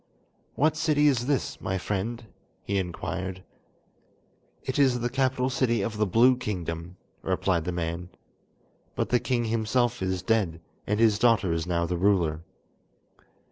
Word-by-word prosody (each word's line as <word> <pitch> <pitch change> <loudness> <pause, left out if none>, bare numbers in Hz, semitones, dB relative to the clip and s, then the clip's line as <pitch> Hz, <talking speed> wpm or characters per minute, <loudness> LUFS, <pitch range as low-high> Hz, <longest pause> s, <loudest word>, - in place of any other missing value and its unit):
"What 155 +3 +2
city 155 -2 +2
is 130 -4 +2
this, 140 -3 -1
my 95 - -1
friend?" 105 +5 -3 0.4
he 100 0 0
inquired. 95 +1 -4 1.2
"It - - -2
is 130 -3 +4
the 120 0 -2
capital 130 -1 +1
city 120 -5 +1
of 110 +1 -3
the 105 -1 +1
Blue 120 +7 +5
Kingdom," 90 -6 -5 0.2
replied 85 -4 0
the 90 - -1
man, 85 0 -3 0.9
"but - - -1
the 125 - +3
king 120 -2 0
himself 115 +1 0
is 95 -1 -1
dead, 95 -6 +1 0.3
and 105 +1 0
his 110 -3 +4
daughter 115 -7 +3
is 80 +1 -2
now 85 -1 0
the 90 +1 -2
ruler." 85 -5 +2
105 Hz, 145 wpm, -27 LUFS, 90-120 Hz, 1.2 s, Blue